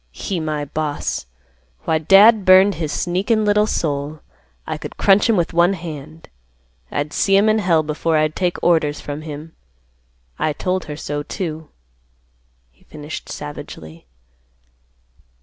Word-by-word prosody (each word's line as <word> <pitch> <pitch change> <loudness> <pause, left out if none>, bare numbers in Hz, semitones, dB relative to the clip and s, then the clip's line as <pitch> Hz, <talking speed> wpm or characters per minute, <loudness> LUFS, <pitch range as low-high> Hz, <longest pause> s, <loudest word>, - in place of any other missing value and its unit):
He 185 - -4
my 155 -2 -3
boss! 150 - -3 0.6
Why, 160 -1 +1
dad 200 +6 +6
burn 185 +2 +7
his 160 -4 -4
sneakin' 200 +7 0
little 210 +1 +3
soul, 145 -4 -2 0.4
I - - -3
could - - -8
crunch 205 +3 +4
him 220 - +3
with 170 0 0
one 175 +3 +4
hand. 160 -2 -8 0.6
I'd 145 +2 -3
see 195 - +2
him 205 +2 +4
in 215 0 +3
hell 170 -5 +2
before 155 +1 0
I'd 155 0 +1
take 180 -2 -1
orders 155 -4 +2
from 145 +1 -6
him. 155 +1 -8 0.9
I 155 - 0
told 185 +4 -2
her 150 -1 -7
so, 145 -1 -4
too," 160 0 -5 1.0
he - - -29
finished 150 0 -8
savagely. 85 - -9
160 Hz, 140 wpm, -20 LUFS, 150-185 Hz, 1.0 s, burn